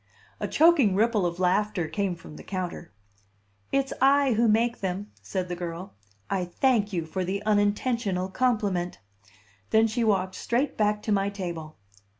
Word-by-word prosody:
A - - -2
choking 300 - +4
ripple 215 -3 +2
of 170 0 -5
laughter 185 -1 +1
came 185 +3 -1
from 165 -2 -12
the - - -10
counter. 180 -3 -5 0.8
"It's 275 0 0
I 275 -1 +5
who 230 +2 +3
make 230 +2 +2
them," 195 +2 -4
said 185 -2 -3
the 175 - -4
girl. 175 +1 -6 0.3
"I 190 -2 -1
thank 210 +3 +1
you 170 -4 -2
for 185 +4 -3
the 195 +3 -3
unintentional 205 -2 +1
compliment." 200 -6 0 0.7
Then 220 0 +4
she 230 +2 -1
walked 190 -4 +1
straight 250 +5 -1
back 210 -1 +1
to 215 - -2
my 200 -1 +2
table. 170 -6 -6
200 Hz, 155 wpm, -26 LUFS, 180-225 Hz, 0.8 s, I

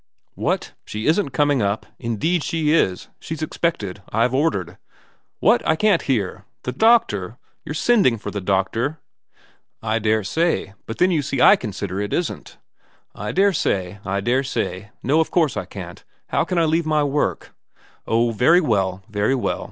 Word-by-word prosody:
' - - -54
What? - - -2
She 105 +1 -5
isn't 165 +1 +2
coming 145 -2 +2
up? 100 +1 -1
Indeed 140 - 0
she 160 -2 0
is. 95 - +1
She's 160 -1 -5
expected. 105 - -2
I've 115 +3 +1
ordered 130 - 0 0.2
' - - -33
' - - -48
What? - - +4
I 160 - +2
can't 200 0 +3
hear. 105 -7 -1 0.2
The 125 - -2
doctor? 125 - +2 0.3
You're 150 - -6
sending 195 - +3
for - - -6
the 100 - -4
doctor? 100 +10 0 0.3
' - - -32
' - - -54
I 115 - +2
daresay. 110 - 0
But 115 - -5
then 180 +1 +3
you 160 -4 +2
see 135 -1 -3
I - - +8
consider 100 -3 -4
it 105 - -3
isn't.' 175 - -3 0.3
' - - -38
I - - -2
daresay, 105 - +1
I 100 +1 -2
daresay. 120 -4 -1
No, 145 +6 +3
of 160 - +1
course 160 -5 +2
I 105 -3 -3
can't. 90 -2 -9 0.3
How - - +1
can 180 - -2
I 165 - +4
leave 160 +1 +1
my 155 -1 +2
work 145 +1 -1 0.2
' - - -30
' - - -35
Oh, 115 +1 +2
very 125 +11 +4
well, 95 - 0
very 105 +4 0
well. 125 - -1
125 Hz, 185 wpm, -21 LUFS, 100-160 Hz, 0.3 s, I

